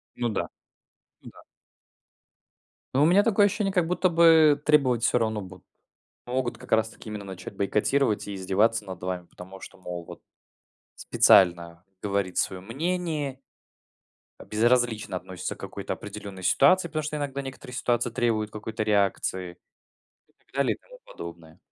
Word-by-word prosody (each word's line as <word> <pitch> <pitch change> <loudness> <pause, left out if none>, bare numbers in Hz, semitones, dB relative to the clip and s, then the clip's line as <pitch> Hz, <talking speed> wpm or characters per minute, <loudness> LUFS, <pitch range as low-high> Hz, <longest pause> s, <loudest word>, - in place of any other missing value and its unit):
Ну 120 -1 -1
да, 110 - -2 0.7
ну - - -11
да. - - -16 1.5
Ну 140 - +4
у - - +6
меня 185 +5 +6
такое 205 -2 +4
ощущение, 200 0 0
как 180 -4 +2
будто 180 +1 +1
бы 160 -3 +6
требовать 130 -6 +3
всё 125 - +3
равно 110 -2 -1
будут. 95 -1 -12 0.6
Могут 125 0 -2
как - - -14
раз 110 0 +3
таки 110 - -12
именно 105 -1 -6
начать 95 -1 -8
бойкотировать 105 +4 +1
и 100 - -5
издеваться 105 +4 +1
над 95 -2 -8
вами, 90 -1 -4
потому 95 +2 -12
что, - - -12
мол 90 -1 -6
вот, - - -11 0.7
специально 85 -1 +3 0.2
говорит 100 -3 -1
своё 95 -1 -1
мнение, 150 - -3 1.0
э, - - -11
безразлично 115 -3 +1
относится 90 -2 -6
к - - -24
какой-то - - -5
определенной 95 -2 -8
ситуации, 170 - +4
потому 155 -1 -3
что 150 +1 -3
иногда 140 -1 -3
некоторые 130 -1 -8
ситуации 120 -1 0
требуют 110 -2 0
какой-то 110 +1 -6
реакции. 95 -4 0 0.7
И - - -33
так - - -39
далее, 140 -1 +1
и - - -17
тому - - -16
подобное. 85 -1 -10
110 Hz, 155 wpm, -26 LUFS, 95-140 Hz, 1.5 s, у